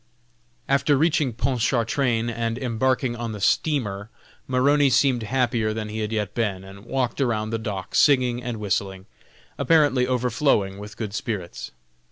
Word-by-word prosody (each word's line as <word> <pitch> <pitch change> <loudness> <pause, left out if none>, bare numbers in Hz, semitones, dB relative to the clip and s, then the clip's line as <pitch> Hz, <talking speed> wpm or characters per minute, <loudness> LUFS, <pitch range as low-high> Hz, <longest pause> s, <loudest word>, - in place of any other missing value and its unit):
After 140 +1 +3
reaching 150 -3 +2
Pontchartrain, 120 0 0
and 115 0 -2
embarking 125 0 0
on 115 -1 -4
the 105 - -6
steamer, 105 -3 0 0.4
Maroney 140 +2 +3
seemed 130 -1 +3
happier 115 -2 0
than 110 -1 -4
he 110 +1 -5
had 105 0 -3
yet 105 -4 -2
been, 100 -5 -2
and 100 +2 -13
walked 130 +1 -1
around 110 -4 0
the 115 - -1
deck, 95 -4 -5
singing 125 -4 +3
and 120 -2 -4
whistling, 95 -2 -2 0.5
apparently 145 -6 +3
overflowing 125 -5 +1
with 105 +1 -10
good 105 -4 -5
spirits. 100 -5 -4
115 Hz, 145 wpm, -24 LUFS, 105-130 Hz, 0.5 s, After